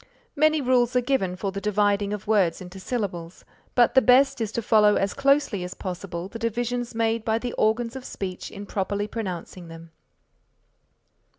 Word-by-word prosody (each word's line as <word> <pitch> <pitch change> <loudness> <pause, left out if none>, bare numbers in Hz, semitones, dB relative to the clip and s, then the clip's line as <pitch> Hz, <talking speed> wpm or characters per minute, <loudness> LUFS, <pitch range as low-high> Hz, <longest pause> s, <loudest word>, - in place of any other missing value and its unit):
Many 310 +1 +3
rules 250 -1 +2
are 250 - +4
given 240 -8 0
for 195 +1 -3
the 200 +1 -5
dividing 205 -1 +1
of 210 -2 -5
words 200 -6 +2
into 185 +1 -10
syllables, 185 -5 -4 0.3
but 240 -2 +4
the 265 - +6
best 255 0 +4
is 215 -2 -2
to 235 - -1
follow 210 -1 +5
as 195 0 0
closely 275 -8 +2
as 180 - -6
possible 180 -2 -5
the 230 - -9
divisions 240 +1 -2
made 225 0 0
by 220 0 +1
the 240 +1 -4
organs 230 +3 0
of 265 - -7
speech 185 -6 -6
in 200 +1 -9
properly 200 +1 -2
pronouncing 185 -5 -6
them. 165 0 -12
210 Hz, 175 wpm, -25 LUFS, 190-245 Hz, 0.3 s, the